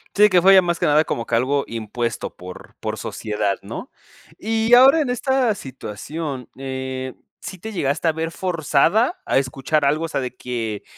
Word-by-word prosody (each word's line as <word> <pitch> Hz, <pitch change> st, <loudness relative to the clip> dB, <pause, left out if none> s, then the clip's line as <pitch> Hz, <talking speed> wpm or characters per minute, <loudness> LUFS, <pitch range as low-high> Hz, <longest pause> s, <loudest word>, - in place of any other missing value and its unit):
Sí, 210 Hz, +1 st, +7 dB
que 180 Hz, -2 st, +4 dB
fue 195 Hz, +2 st, +7 dB
ya 190 Hz, -, +8 dB
más 170 Hz, -1 st, -1 dB
que -, -, +2 dB
nada 150 Hz, +1 st, +4 dB
como 115 Hz, -6 st, -3 dB
que 115 Hz, -, -2 dB
algo 140 Hz, +4 st, +1 dB
impuesto 115 Hz, +1 st, -4 dB
por 90 Hz, 0 st, -11 dB
por -, -, -4 dB
sociedad, 105 Hz, -2 st, -2 dB
¿no? 115 Hz, -, -7 dB, 0.5 s
Y 225 Hz, +2 st, +2 dB
ahora 270 Hz, +5 st, +7 dB
en 275 Hz, -5 st, 0 dB
esta 250 Hz, -2 st, +1 dB
situación, 135 Hz, -, -6 dB
eh, 130 Hz, -1 st, -5 dB, 0.3 s
¿sí 185 Hz, -, -8 dB
te 220 Hz, +5 st, -7 dB
llegaste 155 Hz, -1 st, 0 dB
a -, -, +3 dB
ver 160 Hz, +1 st, -3 dB
forzada 180 Hz, -, +1 dB
a -, -, +3 dB
escuchar 135 Hz, +3 st, 0 dB
algo? 155 Hz, +4 st, +1 dB
O -, -, -9 dB
sea, 145 Hz, -, -2 dB
de 125 Hz, -1 st, -5 dB
que 115 Hz, -4 st, -4 dB
145 Hz, 185 wpm, -21 LUFS, 125-190 Hz, 0.5 s, ya